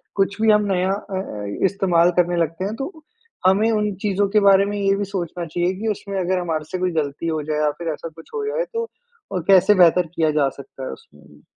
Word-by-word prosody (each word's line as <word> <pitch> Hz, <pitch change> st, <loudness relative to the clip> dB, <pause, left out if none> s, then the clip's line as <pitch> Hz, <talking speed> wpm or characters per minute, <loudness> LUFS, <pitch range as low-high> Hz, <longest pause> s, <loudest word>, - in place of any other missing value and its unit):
कुछ 200 Hz, +1 st, 0 dB
भी 220 Hz, -1 st, +5 dB
हम 210 Hz, 0 st, +3 dB
नया 185 Hz, +1 st, +1 dB
अ 200 Hz, -1 st, -4 dB
अ, 105 Hz, -, -6 dB, 0.2 s
इस्तेमाल 180 Hz, -3 st, +3 dB
करने 175 Hz, 0 st, +2 dB
लगते 165 Hz, +3 st, -2 dB
हैं 210 Hz, +3 st, -3 dB
तो, 270 Hz, +8 st, -5 dB, 0.6 s
हमें 210 Hz, +4 st, +4 dB
उन 210 Hz, -1 st, 0 dB
चीज़ों 200 Hz, -1 st, +1 dB
के 210 Hz, +1 st, +4 dB
बारे 195 Hz, 0 st, +5 dB
में 205 Hz, +1 st, -3 dB
ये 195 Hz, 0 st, +2 dB
भी 205 Hz, -, -1 dB
सोचना 175 Hz, -3 st, -4 dB
चाहिए 175 Hz, +3 st, -1 dB
कि 225 Hz, -, -3 dB
उसमें 200 Hz, -1 st, -3 dB
अगर 185 Hz, +1 st, 0 dB
हमारे 160 Hz, -3 st, -2 dB
से 185 Hz, -, -2 dB
कोई 185 Hz, 0 st, 0 dB
गलती 150 Hz, 0 st, -2 dB
हो 160 Hz, -1 st, -1 dB
जाए 150 Hz, 0 st, -2 dB
या 150 Hz, -1 st, +2 dB
फ़िर 170 Hz, -1 st, -3 dB
ऐसा 165 Hz, +2 st, -7 dB
कुछ 165 Hz, -, -14 dB
हो 430 Hz, -1 st, -2 dB
जाए -, -, -1 dB
तो 460 Hz, 0 st, -1 dB
अ, 465 Hz, -, -9 dB
कैसे 195 Hz, +1 st, +6 dB
बेहतर 170 Hz, +1 st, +4 dB
किया 160 Hz, -2 st, +2 dB
जा 140 Hz, -2 st, +3 dB
सकता 135 Hz, -1 st, -11 dB
है -, -, -5 dB
उसमें। 75 Hz, 0 st, -14 dB
जी। 75 Hz, 0 st, -20 dB
185 Hz, 240 wpm, -21 LUFS, 165-205 Hz, 0.6 s, कैसे